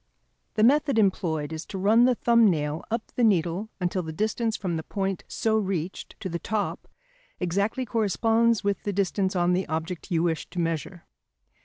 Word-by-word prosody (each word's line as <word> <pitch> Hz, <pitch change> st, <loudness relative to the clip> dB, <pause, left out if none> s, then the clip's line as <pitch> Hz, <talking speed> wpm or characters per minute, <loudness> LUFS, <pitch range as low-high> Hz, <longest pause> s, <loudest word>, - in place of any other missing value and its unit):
The 215 Hz, -, +2 dB
method 280 Hz, +1 st, +4 dB
employed 165 Hz, -7 st, +1 dB
is 160 Hz, +1 st, -5 dB
to 195 Hz, -, -6 dB
run 215 Hz, +5 st, +5 dB
the 255 Hz, -1 st, +3 dB
thumb 235 Hz, -2 st, +4 dB
nail 150 Hz, -2 st, -1 dB
up 225 Hz, 0 st, -3 dB
the 245 Hz, -, +1 dB
needle 190 Hz, 0 st, +2 dB
until 180 Hz, 0 st, 0 dB
the 160 Hz, -2 st, -6 dB
distance 220 Hz, +5 st, -1 dB
from 180 Hz, -4 st, -2 dB
the 160 Hz, -, -2 dB
point 195 Hz, +2 st, -3 dB
so 220 Hz, -1 st, +1 dB
reached 190 Hz, -3 st, -4 dB
to 200 Hz, -, -3 dB
the 170 Hz, -1 st, -3 dB
top 210 Hz, +2 st, -3 dB, 0.5 s
exactly 200 Hz, +8 st, 0 dB
corresponds 225 Hz, +1 st, +2 dB
with 200 Hz, -1 st, 0 dB
the 205 Hz, -, -3 dB
distance 190 Hz, 0 st, 0 dB
on 175 Hz, 0 st, +2 dB
the 185 Hz, +1 st, 0 dB
object 160 Hz, +4 st, -4 dB
you 165 Hz, -3 st, +1 dB
wish 165 Hz, -2 st, -1 dB
to -, -, -12 dB
measure. 165 Hz, +1 st, -3 dB
195 Hz, 180 wpm, -26 LUFS, 170-220 Hz, 0.5 s, run